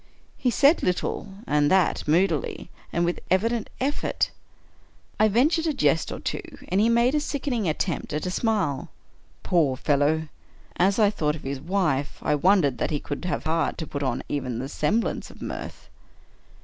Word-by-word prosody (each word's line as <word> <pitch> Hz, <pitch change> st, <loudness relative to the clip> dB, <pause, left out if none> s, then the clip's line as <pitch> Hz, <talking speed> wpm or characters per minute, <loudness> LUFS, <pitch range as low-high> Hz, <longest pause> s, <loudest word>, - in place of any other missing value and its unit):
He 250 Hz, -, 0 dB
said 280 Hz, +7 st, +4 dB
little, 180 Hz, +2 st, -1 dB
and 145 Hz, -4 st, +2 dB
that 190 Hz, -4 st, +2 dB
moodily, 165 Hz, 0 st, +1 dB, 0.2 s
and 170 Hz, 0 st, +1 dB
with 175 Hz, -, -1 dB
evident 225 Hz, +4 st, +1 dB
efifort. 280 Hz, +3 st, 0 dB, 0.9 s
I 215 Hz, -, +6 dB
ventured 300 Hz, -, +2 dB
a 310 Hz, -, +1 dB
jest 150 Hz, -, +2 dB
or -, -, -5 dB
two, -, -, -3 dB, 0.3 s
and 190 Hz, +3 st, +2 dB
he 225 Hz, -, +4 dB
made 235 Hz, +3 st, +3 dB
a 300 Hz, -, +3 dB
sickening 270 Hz, -, -1 dB
attempt 155 Hz, +1 st, -2 dB
at 150 Hz, +3 st, -2 dB
a 180 Hz, -, -1 dB
smile. 195 Hz, -, 0 dB, 0.5 s
Poor 150 Hz, -7 st, +2 dB
fellow! 150 Hz, +3 st, +1 dB, 0.3 s
— -, -, -24 dB
as 200 Hz, -, +1 dB
I 210 Hz, -3 st, +4 dB
thought 150 Hz, -6 st, 0 dB
of 155 Hz, -, -10 dB
his 135 Hz, 0 st, -4 dB
wife, 155 Hz, -7 st, 0 dB
I -, -, +2 dB
wondered 150 Hz, -3 st, +3 dB
that -, -, 0 dB
he 150 Hz, -, -1 dB
could 145 Hz, +5 st, -5 dB
have 180 Hz, -, -2 dB
heart 160 Hz, +1 st, 0 dB
to 160 Hz, -, -4 dB
put 140 Hz, -1 st, -5 dB
on 135 Hz, -, -1 dB
even 130 Hz, -5 st, -3 dB
the 130 Hz, +3 st, -4 dB
semblance 215 Hz, +12 st, -1 dB
of -, -, -15 dB
mirth. -, -, -7 dB
175 Hz, 175 wpm, -25 LUFS, 150-220 Hz, 0.9 s, I